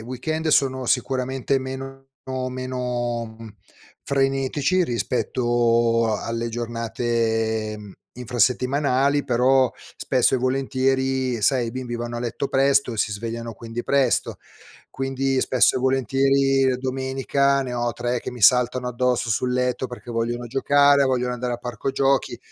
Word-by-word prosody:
weekend 155 +7 -3
sono 130 -3 +2
sicuramente 130 +1 0
meno 135 0 -7 0.4
meno, 125 -2 -3
mhmm, 110 -2 -11 0.5
frenetici 135 +5 +1
rispetto 120 - +1
a - - -3
alle 115 0 -3
giornate, 115 -2 -2
mhmm, 105 -2 -11 0.2
infrasettimanali, 130 +3 +1
però 130 0 +3 0.3
spesso 130 0 +2
e - - +2
volentieri, 130 -1 0
sai, 125 -1 +2
i - - -4
bimbi 125 -1 -5
vanno 120 0 -4
a - - -4
letto 120 +3 -3
presto 135 -2 +2
e - - -6
si 105 0 0
svegliano 115 +2 -5
quindi 115 +2 -7
presto. 135 -3 +1 0.5
Quindi 135 0 -1
spesso 130 0 +3
e - - +1
volentieri, 135 +1 +2
uhm, 125 - -1
domenica 135 +1 0
ne 125 - -5
ho 120 -1 -1
3 120 +1 -2
che - - -6
mi 125 -2 -10
saltano 125 +2 +4
addosso 125 -1 0
sul 125 +4 0
letto 125 0 0
perché 125 0 -10
vogliono 120 +1 -2
giocare, 140 +3 +4
vogliono 125 -2 0
andare 125 0 -3
al 120 - -6
parco 120 +2 -4
giochi, 135 0 0
125 Hz, 140 wpm, -23 LUFS, 120-135 Hz, 0.5 s, saltano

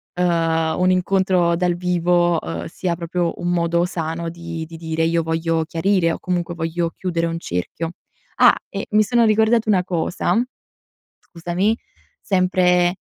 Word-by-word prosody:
ehm, 165 -2 +1
un 185 0 +3
incontro 185 -2 +2
dal 180 -1 +1
vivo, 175 -1 +1
ehm, 85 +1 -5
sia 175 -2 -3
proprio 170 0 -2
un 175 - -2
modo 170 0 +1
sano 165 -1 -3
di 165 -1 -6
di 165 +1 -11
dire: 160 0 -2
"Io 165 0 +2
voglio 165 0 0
chiarire", 165 +1 +1
o - - -6
comunque, 175 -1 -2
"voglio 165 +1 -2
chiudere 170 -2 -2
un 165 0 -3
cerchio". 160 - -4 0.5
Ah! - - +7
E 200 - -5
mi 215 0 +5
sono 235 +2 +2
ricordata 220 +1 +3
una 185 -3 +3
cosa, 175 +1 -1 0.8
scusami, 175 +6 -1 0.4
sempre, 180 -1 +2
175 Hz, 145 wpm, -21 LUFS, 165-180 Hz, 0.8 s, Ah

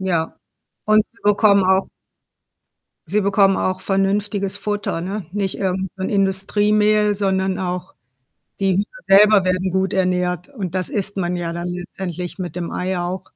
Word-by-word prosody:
Ja. 175 -4 -1 0.5
Und 215 0 +4
sie 230 - -27
bekommen 205 -1 +4
auch 190 +1 +2 1.2
Sie 205 +6 +1
bekommen 195 -1 +3
auch 185 0 -1
vernünftiges 200 +1 0
Futter, 205 -4 -3
ne? 195 +2 -4
Nicht 200 -1 -2
irgend 190 -1 -1
so 190 - -6
'n - - -1
Industriemehl, 210 +2 +2
sondern 190 -1 0
auch 180 0 -4 0.7
die 195 -2 +2
Hühner 200 +2 +1 0.3
selber 210 -2 +6
werden 185 0 0
gut 190 +1 0
ernährt 180 -1 0
und 190 - -6
das 185 -2 0
isst 200 0 -2
man 180 -2 -1
ja 170 -1 -3
dann 175 +1 -4
letztendlich 180 0 -6
mit 180 -2 -5
dem 170 -1 -3
Ei 185 0 -2
auch. 180 +2 -4
190 Hz, 155 wpm, -20 LUFS, 180-205 Hz, 1.2 s, selber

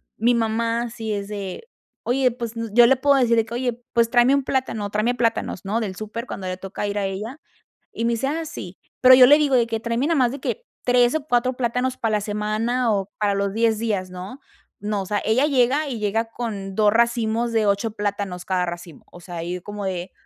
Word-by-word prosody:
mi 240 +3 +2
mamá 230 +1 0
sí 225 -1 -5
es 200 -1 -3
de: 200 - -6 0.4
"Oye, 255 +1 +2
pues, 235 -1 -6
n" 230 0 -4
yo 240 +1 +8
le 265 - +5
puedo 280 +2 +3
decir 240 -3 +3
de 225 - +3
que: 225 +2 -7
"Oye, 245 -1 -3
pues, 230 -1 +2
tráeme 245 +3 +4
un 280 -2 -1
plátano, 240 -7 -2
tráeme 215 +4 0
plátanos, 230 -6 -1
¿no?, 215 +4 -1
del 190 -4 -4
súper", 220 +2 -5
cuando 190 -6 -6
le 185 - -2
toca 195 +2 -5
ir 205 0 -3
a 200 - 0
ella. 210 +9 -5 0.5
Y 230 - -4
me 235 - +2
dice: 230 +3 -1
"Ah, 320 +4 -2
sí". 195 - -8 0.2
Pero 255 0 +9
yo 255 0 +9
le 290 +4 +7
digo 290 -3 +2
de 240 -2 +4
que 225 -1 -3
"tráeme 235 +5 -1
nada 330 -3 +2
más 250 -2 +3
de 275 +2 -7
que 480 - -4 0.2
3 245 0 +3
o 315 -3 -1
4 250 -1 +1
plátanos 250 +1 -1
para 220 -2 0
la - - -1
semana 215 +4 -1
o 195 0 -2
para 205 -1 +1
los 200 0 -1
10 225 -1 +2
días", 205 -5 -2
¿no? 185 +9 -8 0.4
No, 205 -1 -2
o - - -8
sea, 205 +1 -1
ella 250 +6 +3
llega 280 +2 +2
y 245 -4 -4
llega 215 +2 0
con 205 -5 -5
2 210 0 +3
racimos 235 0 +1
de 225 -1 +2
8 205 +2 +1
plátanos 205 -4 -3
cada 185 -1 0
racimo, 170 -2 -8
o 175 - -13
sea, 175 -1 -7
y 175 +2 -4
como 205 +1 -6
de, 180 -1 -4
225 Hz, 235 wpm, -22 LUFS, 205-245 Hz, 0.5 s, Pero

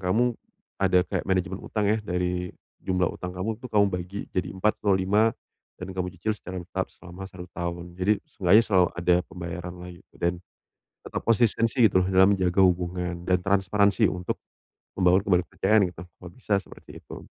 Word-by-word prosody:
kamu, 110 +6 +1 0.4
ada 95 -2 +4
kayak - - -3
manajemen 95 0 0
utang 105 -2 -1
ya, 110 - +3
dari 90 -1 -2 0.3
jumlah 90 -1 +1
utang 90 0 -6
kamu, 100 +4 -3
itu - - -19
kamu 105 -2 +4
bagi 90 +2 -4 0.2
jadi 90 - -1
4 105 +3 +1
atau 100 - +4
5, 105 +4 +2 0.5
dan 95 +1 -6
kamu 90 0 -2
cicil 110 +5 -2
secara 95 -2 -7
bertahap 85 - -4
selama 90 +2 -10
1 90 -1 -10
tahun. 85 0 -5
Jadi, 100 +3 +1
seenggaknya 100 +4 +4
selalu 90 -3 +4
ada 90 0 +4
pembayaran 90 0 -7
lah, 90 - -8
gitu. 85 +2 -19
Dan, 85 +1 +1 0.7
tetap - - -5
konsistensi, 115 +1 +2
gitu 95 -1 +2
loh, 95 - -2
dalam 95 +2 +5
menjaga 90 0 +1
hubungan 90 -1 -1
dan 90 0 +2
transparansi 100 +2 +2
untuk 90 -1 -3 0.6
membangun 90 +1 +3
kembali 90 -2 +3
kepercayaan 105 +2 +3
gitu, 85 0 -10
kalau 90 +1 -13
bisa 105 +3 -4
seperti - - -14
itu. - - -10
90 Hz, 175 wpm, -26 LUFS, 90-100 Hz, 0.7 s, dalam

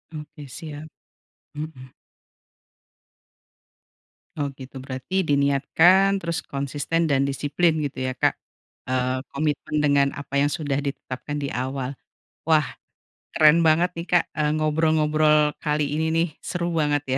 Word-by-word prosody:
Oke 150 0 -9
siap. 155 +2 -8 0.7
Mhm. 145 -4 -8 2.5
Oh, 145 - 0
gitu. 135 0 -10
Berarti 135 +8 -3
diniatkan, 155 +8 +4
terus 170 -1 -1
konsisten 145 +4 -2
dan 140 0 +2
disiplin, 145 +5 +1
gitu 140 -2 -4
ya, 130 - -3
Kak? - - +2 0.6
Eee, 130 0 0
komitmen 150 +1 -2
dengan 140 -1 +4
apa 140 0 -2
yang 145 - +3
sudah 145 -3 -1
ditetapkan 140 0 -5
di 140 -1 -3
awal. 130 +1 -3 0.5
Wah, 155 -2 +3 0.7
keren 155 +2 +6
banget 170 +3 +4
nih, 170 - -4
Kak, 175 -2 +3
eee, 150 -1 0
ngobrol-ngobrol 155 -1 +3
kali 150 -1 0
ini 160 +1 0
nih. 165 +2 +2
Seru 175 -1 -3
banget, 150 -2 +1
ya. - - +2
150 Hz, 125 wpm, -24 LUFS, 140-160 Hz, 2.5 s, keren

